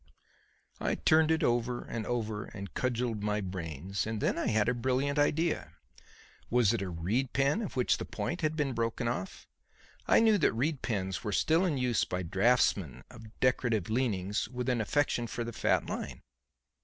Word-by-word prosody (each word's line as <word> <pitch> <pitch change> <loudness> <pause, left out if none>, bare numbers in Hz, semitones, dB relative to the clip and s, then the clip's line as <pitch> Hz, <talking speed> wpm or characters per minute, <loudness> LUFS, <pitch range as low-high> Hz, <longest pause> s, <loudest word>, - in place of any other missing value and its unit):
I - - 0
turned 155 0 +4
it 160 0 +2
over 120 +1 0
and 115 -2 -5
over 110 -3 -2
and 100 -3 -9
cudgelled 120 -3 -1
my 105 0 0
brains; 90 0 -4
and 110 -1 -2
then - - +1
I - - -1
had 110 -1 +2
a 125 - +3
brilliant 130 +4 0
idea. 160 +3 +1 0.8
Was 120 -3 +3
it 115 - -1
a 95 - -3
reed 100 +11 -1
pen 140 - +2
of 205 - -5
which 125 -2 +2
the - - -4
point 175 - -4
had 155 0 0
been 145 -4 0
broken 115 0 -1
off? 105 -6 -4 0.6
I - - +6
knew 220 -2 +4
that - - +3
reed 140 +5 -1
pens 95 -4 -2
were 105 - -2
still 160 - +3
in 160 -6 0
use 125 -3 +1
by 90 0 -3
draughtsmen 95 - +2
of 110 0 -14
decorative 120 -6 +1
leanings 105 -5 0
with 125 0 -3
an 120 -3 +1
affection 125 0 0
for 120 +1 -4
the 115 0 -6
"fat - - +1
line." - - -5
120 Hz, 180 wpm, -31 LUFS, 105-130 Hz, 0.8 s, I